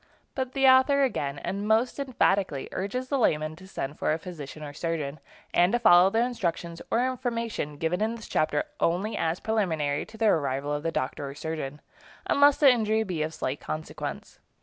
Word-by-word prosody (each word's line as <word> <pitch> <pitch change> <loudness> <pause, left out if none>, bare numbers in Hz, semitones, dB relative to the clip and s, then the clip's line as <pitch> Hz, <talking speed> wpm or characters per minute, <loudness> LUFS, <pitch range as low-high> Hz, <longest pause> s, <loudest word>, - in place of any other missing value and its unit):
But 260 -1 -3
the 270 -1 +2
author 260 +2 +6
again, 145 - -1
and 200 +8 -4
most 225 +5 +2
emphatically, 195 - +1
urges 250 +7 -3
the 280 - +1
layman 155 -7 +1
to 185 +2 -13
send 145 -6 -5
for - - +1
a - - 0
physician 155 -4 -8
or 145 -1 -7
surgeon, 155 -2 -3 0.3
and 175 +4 +4
to - - +4
follow 180 -4 +7
the 225 +4 +2
instructions 170 -8 -3
or 240 +2 +2
information 230 - -3
given 165 +5 -1
in 220 +2 0
this 225 - -10
chapter 150 -1 +1 0.2
only 190 +6 0
as 165 +2 -1
preliminary 160 -10 -1
to 220 - -13
the 225 - +1
arrival 140 -2 0
of 145 - -2
the 165 +1 -1
doctor 140 0 -3
or 140 - -9
surgeon, 150 -2 -5 0.4
unless 285 0 +5
the 280 -3 +7
injury 220 -2 +1
be 180 -6 -3
of 155 +1 -1
slight 135 +3 -3
consequence. 155 +1 -6
180 Hz, 190 wpm, -27 LUFS, 155-230 Hz, 0.4 s, follow